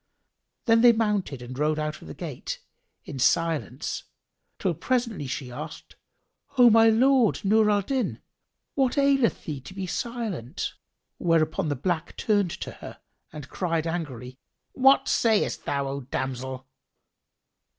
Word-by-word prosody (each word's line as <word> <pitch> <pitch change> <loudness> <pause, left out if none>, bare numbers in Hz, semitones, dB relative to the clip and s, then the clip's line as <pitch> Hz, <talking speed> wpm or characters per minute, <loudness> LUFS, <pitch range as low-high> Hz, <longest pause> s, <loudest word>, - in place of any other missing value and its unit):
Then 225 -1 +5
they 240 0 +8
mounted 205 - -1
and 125 +2 -8
rode 150 +1 +1
out 155 0 -3
of - - -12
the 75 - -8
gate[FN#5] - - -5 0.5
in 135 - -7
silence 155 -2 0 0.5
till - - 0
presently 235 - -1
she 130 0 -5
asked, 120 - -8 0.6
"O 245 -2 +8
my 225 +1 +7
lord 245 -1 +3
Nur 215 +2 +4
al 205 -1 +2
Din, 260 +4 -1 0.5
what 265 -1 +1
aileth 275 -4 +3
thee 145 -4 -4
to 185 - -11
be 195 -1 -3
silent?" 210 - -4 0.5
Whereupon 160 -2 +1
the 145 - 0
black 165 +4 -2
turned 205 -4 +2
to - - -6
her - - -11 0.3
and 150 -2 -8
cried 165 -3 -1
angrily, 135 -7 -5 0.3
"What 270 +1 +5
sayst 220 -3 +1
thou, 140 -1 -1
O 140 +1 -4
damsel?" 130 0 -4
175 Hz, 140 wpm, -26 LUFS, 140-225 Hz, 0.6 s, they